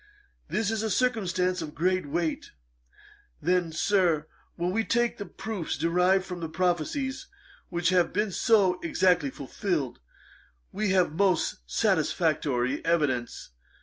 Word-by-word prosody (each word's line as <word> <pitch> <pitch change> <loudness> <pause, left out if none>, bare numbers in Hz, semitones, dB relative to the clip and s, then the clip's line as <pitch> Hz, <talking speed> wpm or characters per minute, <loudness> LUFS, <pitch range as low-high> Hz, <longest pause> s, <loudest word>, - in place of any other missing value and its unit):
This 220 0 0
is 220 -1 -1
a 220 - -1
circumstance 185 -6 0
of 155 -2 -7
great 185 +1 0
weight. 160 +2 -2 0.9
Then, 175 0 +1
Sir, 170 -3 +2 0.3
when 175 +1 -1
we 225 +4 +1
take 240 +1 0
the 205 - -5
proofs 210 -7 -4
derived 180 +4 +2
from 180 -2 -6
prophecies 180 - -1 0.4
which 170 -1 0
have 180 -2 +3
been 210 +2 0
so 190 -3 +3
exactly 175 -3 +2
fulfilled, 140 - -3 0.7
we 210 0 -1
have 185 -5 +2
most 185 -1 +1
satisfactory 130 - +1
evidence. 140 - -1
180 Hz, 120 wpm, -27 LUFS, 160-200 Hz, 0.9 s, have